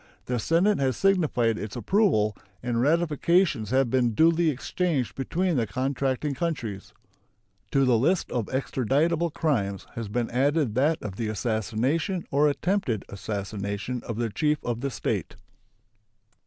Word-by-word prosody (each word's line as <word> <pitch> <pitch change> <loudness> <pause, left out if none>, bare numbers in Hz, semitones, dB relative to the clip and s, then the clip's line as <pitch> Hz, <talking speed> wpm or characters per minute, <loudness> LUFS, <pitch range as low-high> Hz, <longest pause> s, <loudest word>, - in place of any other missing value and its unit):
The 125 -1 -1
Senate 175 - +2
has 130 -3 0
signified 150 - +2
its 105 -1 -6
approval, 140 - +2 0.3
and 120 -1 0
ratifications 160 - +2
have 130 -1 +2
been 120 -4 +2
duly 165 +2 +4
exchanged 145 -1 -1
between 170 +4 -1
the 115 -3 +1
contracting 135 +4 -1
countries. 125 - -4 0.8
To 135 -1 +3
the 120 -3 +4
list 170 +9 +1
of 120 -4 -1
extraditable 145 +6 0
crimes 100 - -1
has 115 -2 -5
been 115 +3 -2
added 140 0 +1
that 150 +7 +2
of 100 -2 -6
the 115 - -2
assassination 115 - -1
or 145 +2 +4
attempted 145 - -1
assassination 100 +3 -4
of 115 - -5
the 115 -1 -1
chief 150 +5 +1
of 120 -1 -2
the 140 - -1
State. - - -3
130 Hz, 140 wpm, -26 LUFS, 115-160 Hz, 0.8 s, duly